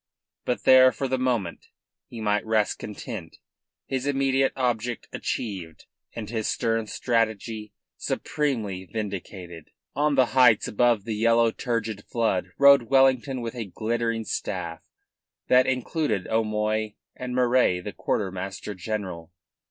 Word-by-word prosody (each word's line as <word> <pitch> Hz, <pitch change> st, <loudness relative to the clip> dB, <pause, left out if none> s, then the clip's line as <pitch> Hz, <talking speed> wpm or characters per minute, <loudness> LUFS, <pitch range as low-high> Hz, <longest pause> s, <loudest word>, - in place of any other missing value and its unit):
But 125 Hz, -, -1 dB
there 130 Hz, 0 st, +7 dB
for 135 Hz, -, -3 dB
the 130 Hz, 0 st, -1 dB
moment 120 Hz, -9 st, -1 dB, 0.4 s
he 115 Hz, -, -8 dB
might 105 Hz, -1 st, +1 dB
rest 110 Hz, -1 st, +1 dB
content, 105 Hz, -4 st, -7 dB, 0.5 s
his 135 Hz, +1 st, -3 dB
immediate 135 Hz, -1 st, +2 dB
object 120 Hz, -2 st, -1 dB
achieved 90 Hz, -8 st, -4 dB, 0.3 s
and 110 Hz, -3 st, -5 dB
his 110 Hz, 0 st, -2 dB
stern 115 Hz, -1 st, 0 dB
strategy 110 Hz, -2 st, -1 dB, 0.3 s
supremely 110 Hz, -11 st, -2 dB
vindicated. 95 Hz, -5 st, -6 dB, 0.3 s
On 150 Hz, 0 st, +2 dB
the 130 Hz, -1 st, +5 dB
heights 125 Hz, -5 st, +5 dB
above 120 Hz, -1 st, +2 dB
the 110 Hz, +1 st, -3 dB
yellow, 115 Hz, +1 st, +3 dB
turgid 110 Hz, -4 st, -3 dB
flood 95 Hz, -6 st, 0 dB
rode 140 Hz, -4 st, +6 dB
Wellington 135 Hz, -1 st, +3 dB
with 115 Hz, -1 st, -4 dB
a 120 Hz, -3 st, -4 dB
glittering 115 Hz, +3 st, -2 dB
staff -, -, -4 dB, 0.7 s
that 125 Hz, 0 st, +5 dB
included 130 Hz, -, -1 dB
O'Moy 110 Hz, -1 st, 0 dB, 0.2 s
and 125 Hz, 0 st, -5 dB
Murray, 125 Hz, -7 st, +3 dB
the 100 Hz, +3 st, -7 dB
quartermaster 95 Hz, +3 st, -3 dB
general. 95 Hz, -4 st, -5 dB
115 Hz, 125 wpm, -25 LUFS, 105-125 Hz, 0.7 s, there